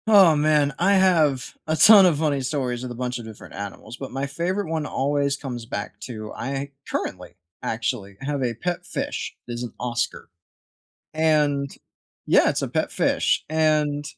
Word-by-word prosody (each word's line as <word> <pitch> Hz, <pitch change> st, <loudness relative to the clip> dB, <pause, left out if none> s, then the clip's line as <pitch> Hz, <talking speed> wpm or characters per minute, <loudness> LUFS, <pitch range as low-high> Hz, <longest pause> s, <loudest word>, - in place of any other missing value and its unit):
Oh, 195 Hz, -7 st, +7 dB
man. 150 Hz, -1 st, +3 dB
I 195 Hz, +4 st, +4 dB
have 165 Hz, -9 st, +3 dB
a 155 Hz, -, +1 dB
ton 205 Hz, +3 st, +8 dB
of 165 Hz, -5 st, +2 dB
funny 145 Hz, -3 st, +1 dB
stories 130 Hz, -3 st, -2 dB
with 125 Hz, -1 st, -5 dB
a -, -, -6 dB
bunch 125 Hz, 0 st, -3 dB
of 115 Hz, -, -8 dB
different 110 Hz, -1 st, -11 dB
animals, 100 Hz, +4 st, -7 dB
but 135 Hz, -, -7 dB
my 135 Hz, +1 st, -2 dB
favorite 170 Hz, +6 st, -2 dB
one 160 Hz, -2 st, -1 dB
always 140 Hz, 0 st, 0 dB
comes 125 Hz, -5 st, -6 dB
back 100 Hz, -1 st, -5 dB
to 110 Hz, -3 st, -7 dB
I 140 Hz, +3 st, -4 dB, 0.2 s
currently, 90 Hz, -1 st, -4 dB, 0.3 s
actually, 100 Hz, -3 st, -3 dB
have 140 Hz, 0 st, -2 dB
a 120 Hz, -2 st, -1 dB
pet 175 Hz, +8 st, -3 dB
fish, 175 Hz, -4 st, -4 dB
is 120 Hz, 0 st, -5 dB
an 120 Hz, -, -6 dB
oscar. 120 Hz, -7 st, -3 dB, 0.9 s
And 150 Hz, -3 st, +2 dB, 0.5 s
yeah, -, -, +5 dB
it's -, -, -1 dB
a -, -, -1 dB
pet -, -, -1 dB
fish, -, -, +1 dB
and 155 Hz, -2 st, +1 dB
140 Hz, 170 wpm, -24 LUFS, 120-155 Hz, 0.9 s, ton